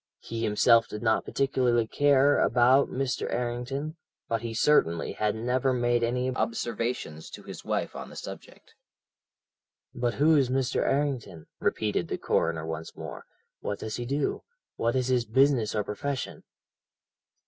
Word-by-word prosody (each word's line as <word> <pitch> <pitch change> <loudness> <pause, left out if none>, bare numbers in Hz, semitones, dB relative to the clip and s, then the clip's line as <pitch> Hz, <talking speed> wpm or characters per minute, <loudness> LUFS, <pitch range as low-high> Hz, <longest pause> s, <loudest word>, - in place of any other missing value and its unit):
He 115 0 -6
himself 115 +1 +4
did 105 - -7
not 110 -1 +2
particularly 125 -4 +1
care 145 +3 +4
about 125 +3 +4
Mr. 135 0 -2
Errington, 125 +6 -3 0.3
but 115 -1 -1
he 115 -1 -4
certainly 110 - +2
had 105 0 -1
never 125 +3 0
made 120 -1 +1
any 125 +2 0
observations 115 -10 -3
to - - -10
his - - -9
wife - - -2
on - - -7
the - - -12
subject. - - -10 1.2
"'But 120 -1 -1
who 155 +3 +4
is 135 -4 +3
Mr. 130 0 0
Errington?' 135 - -1
repeated 105 -5 0
the - - -3
coroner 80 -1 0
once 80 0 -6
more. - - -8 0.3
'What 100 - -3
does 110 - -5
he 120 -1 -4
do? 140 +2 -1 0.3
What 115 +2 0
is 130 -1 0
his 125 -2 +2
business 125 -1 +3
or 105 - +1
profession?' 130 +7 -4
120 Hz, 150 wpm, -28 LUFS, 110-135 Hz, 1.2 s, himself